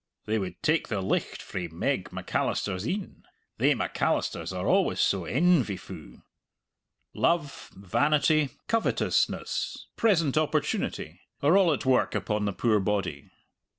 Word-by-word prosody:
they 110 Hz, +1 st, 0 dB
would 90 Hz, -3 st, -5 dB
take 160 Hz, +2 st, +2 dB
the 105 Hz, -, -2 dB
licht 95 Hz, -, -2 dB
frae 90 Hz, -2 st, -4 dB
Meg 80 Hz, 0 st, -2 dB
Macalister's 95 Hz, +4 st, -2 dB
een 195 Hz, +4 st, -4 dB, 0.4 s
thae -, -, +4 dB
Macalisters -, -, -1 dB
are -, -, -4 dB
always -, -, +2 dB
so -, -, +2 dB
en 170 Hz, +4 st, +4 dB
vy 100 Hz, -5 st, -4 dB
fu'!" -, -, -11 dB, 0.9 s
Love, 165 Hz, -5 st, 0 dB
vanity, 145 Hz, -, +2 dB, 0.2 s
covetousness, 225 Hz, -1 st, 0 dB
present 165 Hz, -, +3 dB
opportunity, 155 Hz, -, -2 dB, 0.2 s
are 150 Hz, +6 st, +5 dB
all 190 Hz, -4 st, +5 dB
at 145 Hz, -1 st, -2 dB
work 130 Hz, -1 st, +2 dB
upon 105 Hz, -1 st, -1 dB
the 100 Hz, -, 0 dB
poor 110 Hz, +1 st, +2 dB
body. 95 Hz, -8 st, -2 dB
130 Hz, 130 wpm, -27 LUFS, 100-160 Hz, 0.9 s, are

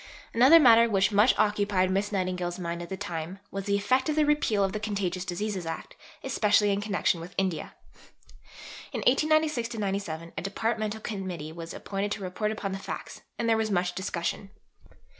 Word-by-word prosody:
Another 260 Hz, +8 st, +8 dB
matter 235 Hz, -4 st, +7 dB
which 195 Hz, -2 st, +2 dB
much 210 Hz, +5 st, +5 dB
occupied 205 Hz, -3 st, +2 dB
Miss 200 Hz, +2 st, 0 dB
Nightingale's 180 Hz, -2 st, -2 dB
mind 170 Hz, -1 st, -4 dB
at 170 Hz, -, -7 dB
this 190 Hz, -, -4 dB
time 175 Hz, -2 st, -5 dB
was 195 Hz, -1 st, -4 dB
the 200 Hz, -1 st, +1 dB
effect 255 Hz, +7 st, +1 dB
of 305 Hz, -, 0 dB
the 305 Hz, -1 st, +3 dB
repeal 290 Hz, -9 st, +2 dB
of 195 Hz, -, 0 dB
the 215 Hz, -, -2 dB
Contagious 200 Hz, -4 st, -2 dB
Diseases 185 Hz, 0 st, -3 dB
Act, 165 Hz, -, -6 dB, 0.3 s
especially 210 Hz, -5 st, +3 dB
in 200 Hz, 0 st, 0 dB
connection 200 Hz, -4 st, 0 dB
with 175 Hz, +2 st, -10 dB
India. 185 Hz, -4 st, -2 dB, 1.2 s
In -, -, -2 dB
1896 300 Hz, -4 st, +2 dB
97 190 Hz, -6 st, -3 dB
a -, -, -3 dB
Departmental 220 Hz, +2 st, -2 dB
Committee 185 Hz, -8 st, -5 dB
was 165 Hz, 0 st, -8 dB
appointed 200 Hz, +1 st, -4 dB
to 210 Hz, -, -6 dB
report 190 Hz, +4 st, -2 dB
upon 205 Hz, -2 st, -4 dB
the 195 Hz, -, -4 dB
facts, -, -, -7 dB, 0.2 s
and 235 Hz, -, -1 dB
there 225 Hz, -1 st, +4 dB
was 220 Hz, -1 st, 0 dB
much 180 Hz, -2 st, 0 dB
discussion. 190 Hz, +1 st, -3 dB
200 Hz, 180 wpm, -28 LUFS, 185-220 Hz, 1.2 s, Another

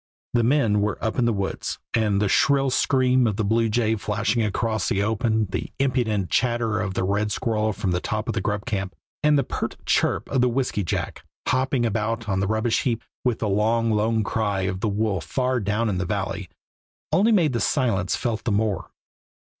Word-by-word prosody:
The 120 Hz, -1 st, +3 dB
men 115 Hz, -5 st, +3 dB
were 105 Hz, 0 st, 0 dB
up 110 Hz, +2 st, -2 dB
in 120 Hz, -, +3 dB
the 120 Hz, -, +3 dB
woods, 100 Hz, -3 st, -3 dB, 0.2 s
and 105 Hz, -4 st, +2 dB
the 105 Hz, -, +2 dB
shrill 135 Hz, +5 st, +3 dB
scream 130 Hz, -1 st, +3 dB
of 105 Hz, -, 0 dB
the 110 Hz, 0 st, -1 dB
bluejay 110 Hz, +1 st, +1 dB
flashing 105 Hz, +2 st, 0 dB
across 110 Hz, -1 st, -1 dB
the 100 Hz, -, +1 dB
open, 110 Hz, 0 st, +1 dB
the -, -, -3 dB
impudent 120 Hz, -8 st, 0 dB
chatter 115 Hz, -2 st, +1 dB
of 100 Hz, -4 st, -3 dB
the -, -, 0 dB
red 105 Hz, +2 st, 0 dB
squirrel 110 Hz, -1 st, 0 dB
from 95 Hz, -2 st, -2 dB
the 90 Hz, -, +1 dB
top -, -, -3 dB
of -, -, -1 dB
the -, -, -1 dB
grub 105 Hz, -1 st, -2 dB
camp, 95 Hz, -3 st, -3 dB, 0.3 s
and 150 Hz, -1 st, +4 dB
the 140 Hz, -, +2 dB
pert -, -, -4 dB
chirp -, -, +1 dB
of 130 Hz, -, +2 dB
the 125 Hz, -, +3 dB
whisky 125 Hz, -4 st, -1 dB
jack, 85 Hz, -, -3 dB, 0.2 s
hopping 130 Hz, -1 st, +1 dB
about 115 Hz, +1 st, -1 dB
on 95 Hz, -2 st, 0 dB
the 100 Hz, -, 0 dB
rubbish 110 Hz, +2 st, +1 dB
heap, 115 Hz, -3 st, -1 dB, 0.2 s
with 125 Hz, -3 st, +1 dB
the 110 Hz, -, -2 dB
long, 110 Hz, +3 st, +2 dB
lone 110 Hz, +1 st, +1 dB
cry 100 Hz, -2 st, -1 dB
of 95 Hz, 0 st, -2 dB
the 105 Hz, -, 0 dB
wolf 100 Hz, -3 st, -1 dB
far 125 Hz, -, 0 dB
down 105 Hz, 0 st, 0 dB
the -, -, 0 dB
valley, 95 Hz, -1 st, -3 dB, 0.6 s
only 215 Hz, +5 st, +4 dB
made 170 Hz, -, +3 dB
the 120 Hz, -, 0 dB
silence 110 Hz, -6 st, +1 dB
felt 115 Hz, -3 st, -2 dB
the 115 Hz, -, -1 dB
more. 105 Hz, -1 st, 0 dB
110 Hz, 200 wpm, -24 LUFS, 100-120 Hz, 0.6 s, and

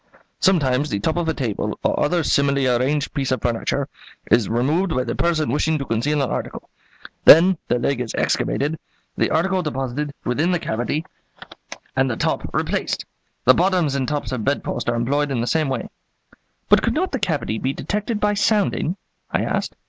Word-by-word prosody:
"Sometimes 145 Hz, -6 st, +2 dB
the 100 Hz, -, -1 dB
top 155 Hz, +10 st, 0 dB
of 170 Hz, -2 st, -1 dB
a -, -, +1 dB
table 115 Hz, -7 st, -2 dB
or -, -, +1 dB
other 170 Hz, +2 st, +1 dB
similarly 140 Hz, -2 st, +2 dB
arranged 130 Hz, +4 st, +1 dB
piece 135 Hz, -3 st, -1 dB
of 130 Hz, -, +1 dB
furniture 115 Hz, -1 st, -1 dB, 0.4 s
is 115 Hz, -4 st, +4 dB
removed 150 Hz, +11 st, +1 dB
by 130 Hz, -, +1 dB
the -, -, -3 dB
person 160 Hz, -6 st, 0 dB
wishing 155 Hz, +3 st, +1 dB
to 140 Hz, -, -4 dB
conceal 140 Hz, +6 st, 0 dB
an 130 Hz, -, -2 dB
article; -, -, -5 dB, 0.5 s
then 180 Hz, +5 st, +8 dB
the -, -, +1 dB
leg 125 Hz, +1 st, -1 dB
is 115 Hz, -, -4 dB
excavated, 150 Hz, +3 st, 0 dB, 0.4 s
the -, -, +1 dB
article 185 Hz, +3 st, +1 dB
deposited 145 Hz, -1 st, -3 dB
within 145 Hz, +8 st, +1 dB
the 180 Hz, -, +2 dB
cavity, 145 Hz, +2 st, -2 dB, 0.9 s
and 130 Hz, 0 st, +2 dB
the 110 Hz, -, -2 dB
top -, -, -1 dB
replaced. -, -, -1 dB, 0.4 s
The 130 Hz, -, +8 dB
bottoms 175 Hz, -3 st, +2 dB
and 135 Hz, -2 st, -1 dB
tops 145 Hz, 0 st, -2 dB
of 125 Hz, -4 st, -3 dB
bedposts 125 Hz, -3 st, -1 dB
are 120 Hz, -, 0 dB
employed 140 Hz, +5 st, 0 dB
in 135 Hz, -3 st, -1 dB
the 115 Hz, -, 0 dB
same 155 Hz, +2 st, +1 dB
way." 130 Hz, -, -3 dB, 0.8 s
"But -, -, +5 dB
could -, -, 0 dB
not 365 Hz, +4 st, 0 dB
the 265 Hz, -, -2 dB
cavity 145 Hz, -, -1 dB
be 130 Hz, -, -1 dB
detected 210 Hz, -, -3 dB
by 210 Hz, 0 st, +2 dB
sounding?" 205 Hz, -4 st, +1 dB, 0.3 s
I -, -, 0 dB
asked. -, -, -2 dB
145 Hz, 185 wpm, -21 LUFS, 125-165 Hz, 0.9 s, then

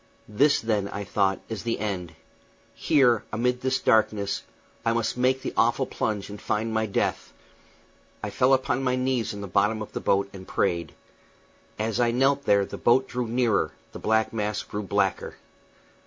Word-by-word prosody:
This, 140 Hz, +8 st, +3 dB
then, 105 Hz, -3 st, 0 dB
I 100 Hz, -, -5 dB
thought, 95 Hz, 0 st, 0 dB
is 110 Hz, -3 st, -5 dB
the 115 Hz, -1 st, -2 dB
end. 90 Hz, -5 st, -4 dB, 0.6 s
Here, 125 Hz, -6 st, +3 dB
amid 125 Hz, +3 st, 0 dB
this 130 Hz, 0 st, +1 dB
darkness, 105 Hz, -2 st, +1 dB, 0.4 s
I 115 Hz, -1 st, +2 dB
must 115 Hz, -1 st, -1 dB
make 130 Hz, +1 st, +1 dB
the -, -, -3 dB
awful -, -, +2 dB
plunge 105 Hz, -2 st, -2 dB
and 105 Hz, 0 st, -9 dB
find 110 Hz, +1 st, -1 dB
my 110 Hz, 0 st, 0 dB
death 100 Hz, -, -1 dB, 0.9 s
I -, -, -3 dB
fell 130 Hz, +1 st, +4 dB
upon 130 Hz, 0 st, -1 dB
my 125 Hz, -1 st, +1 dB
knees 130 Hz, -3 st, 0 dB
in 100 Hz, -1 st, -7 dB
the 100 Hz, -, -5 dB
bottom 105 Hz, +4 st, +1 dB
of 110 Hz, -, -7 dB
the -, -, -3 dB
boat 100 Hz, 0 st, +2 dB
and 95 Hz, -1 st, -10 dB
prayed. 85 Hz, -6 st, -1 dB, 0.8 s
As 110 Hz, +2 st, -1 dB
I 120 Hz, -1 st, +3 dB
knelt 135 Hz, +4 st, +2 dB
there 100 Hz, -1 st, +4 dB
the -, -, -8 dB
boat 130 Hz, +2 st, +3 dB
drew 125 Hz, -1 st, -3 dB
nearer, 120 Hz, -2 st, +1 dB, 0.2 s
the -, -, -9 dB
black 110 Hz, 0 st, +1 dB
mass 105 Hz, -1 st, -2 dB
grew 105 Hz, -, -5 dB
blacker. 100 Hz, -, -1 dB
110 Hz, 175 wpm, -26 LUFS, 100-125 Hz, 0.9 s, fell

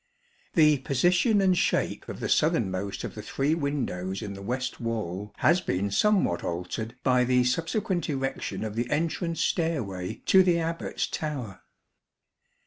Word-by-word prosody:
The 150 Hz, -4 st, +5 dB
position 175 Hz, -, +3 dB
and 185 Hz, -1 st, +4 dB
shape -, -, 0 dB
of -, -, -6 dB
the -, -, -1 dB
southernmost 95 Hz, +1 st, +1 dB
of -, -, -5 dB
the -, -, -7 dB
three 140 Hz, +3 st, 0 dB
windows 120 Hz, -, -2 dB
in 100 Hz, -1 st, -5 dB
the 100 Hz, -, -9 dB
west 125 Hz, +4 st, -3 dB
wall 105 Hz, -4 st, -3 dB
has 170 Hz, +4 st, +3 dB
been 100 Hz, -, -1 dB
somewhat 190 Hz, -, +2 dB
altered 90 Hz, +7 st, -4 dB
by 125 Hz, -1 st, +4 dB
the 125 Hz, 0 st, +3 dB
subsequent 175 Hz, -, -1 dB
erection 135 Hz, -5 st, -3 dB
of 110 Hz, -1 st, -4 dB
the 120 Hz, +1 st, -1 dB
entrance 165 Hz, +2 st, -1 dB
stairway 110 Hz, -, -1 dB
to 190 Hz, -, +7 dB
the 180 Hz, -2 st, +3 dB
Abbat's 165 Hz, 0 st, -2 dB
tower. 135 Hz, -10 st, -5 dB
130 Hz, 145 wpm, -27 LUFS, 100-165 Hz, -, to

